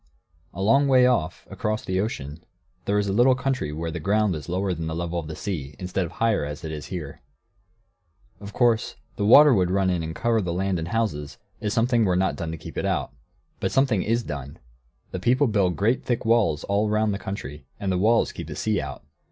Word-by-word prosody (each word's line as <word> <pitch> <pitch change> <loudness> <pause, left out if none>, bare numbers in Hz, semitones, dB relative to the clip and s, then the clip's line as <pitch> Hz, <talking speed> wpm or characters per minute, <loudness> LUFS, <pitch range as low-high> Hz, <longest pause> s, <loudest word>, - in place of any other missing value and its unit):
] 75 0 -37
A 95 - -3
long 135 +7 +4
way 130 -2 +5
off, 120 -11 0
across 110 +1 -2
the 95 0 -1
ocean, 80 -7 -4 0.4
there 100 - +1
is 105 -1 +1
a 95 - 0
little 125 +4 +5
country 130 - -2
where 80 +2 -4
the - - -4
ground 105 -2 +1
is 75 +1 -7
lower 95 +1 0
than 80 -2 -4
the 80 - -3
level 85 0 -2
of 80 - -7
the 80 - -6
sea, 75 -9 -5
instead 90 0 -2
of - - -13
higher, 115 -7 +1
as 75 0 -6
it 80 - -4
is 75 -1 -6
here. 80 -7 -6 1.2
Of 100 0 -9
course 115 -1 +1 0.2
the 100 -2 -1
water 145 +5 +8
would 90 -5 +2
run 95 0 +2
in 90 -2 0
and 80 0 -5
cover 115 -1 +1
the 90 -3 -2
land 95 0 -1
and 80 - -4
houses, 85 -9 -2 0.2
if 105 - -2
something 115 +1 +2
were 95 -4 +2
not 95 +1 +1
done 85 -2 -4
to 80 - -5
keep - - -7
it - - -2
out. - - -1 0.5
But - - -1
something 130 -7 +2
is 115 +4 0
done. 70 -4 -6 0.5
The 90 - -4
people 125 +8 +3
build 100 -7 +1
great, 115 +6 +1
thick 120 -3 -2
walls 115 -10 +2
all 100 +2 0
round 105 0 +1
the 100 - -4
country, 75 -8 -7
and 100 -1 -1
the 90 - 0
walls 115 +4 +3
keep - - -8
the - - -6
sea 110 -2 0
out. 70 -1 -7
95 Hz, 230 wpm, -24 LUFS, 80-115 Hz, 1.2 s, water